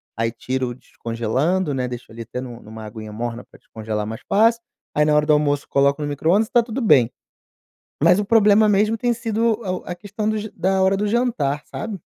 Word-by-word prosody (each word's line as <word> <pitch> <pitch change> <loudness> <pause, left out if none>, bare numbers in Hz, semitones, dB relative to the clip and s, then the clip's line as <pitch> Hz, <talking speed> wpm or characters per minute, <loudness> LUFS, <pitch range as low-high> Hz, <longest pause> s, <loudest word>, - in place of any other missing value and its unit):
aí 115 +1 0
tiro 130 +1 -3
descongelando, 130 +9 -2
né, 125 -1 -1
deixo 120 -2 -8
ali 115 - -9
até 115 +2 -6
nu 120 -2 -8
numa 110 0 -10
aguinha 110 0 -8
morna 120 +2 -4
pra - - -20
descongelar 110 -1 -5
mais 110 +1 -6
fácil, 230 +3 +4 0.3
aí 150 - +4
na 150 0 +3
hora 150 0 +3
do 155 - +4
almoço 145 -1 +1
coloco 140 +2 +2
no 145 - -2
micro-ondas 165 +9 +2
e - - -28
tá 240 - +5
tudo 235 +3 -4
bem. 125 - +5 0.9
Mas 175 +4 +5
o 205 - -1
problema 215 0 +5
mesmo 210 +2 +2
tem 240 +2 +1
sido 225 -1 0
o 185 -3 -3
a 180 - -4
questão 205 +3 -4
do 215 - 0 0.2
da 190 +2 +1
hora 190 +1 +3
do 210 - -1
jantar, 205 - 0
sabe? 215 -4 -6
150 Hz, 210 wpm, -21 LUFS, -, 0.9 s, tá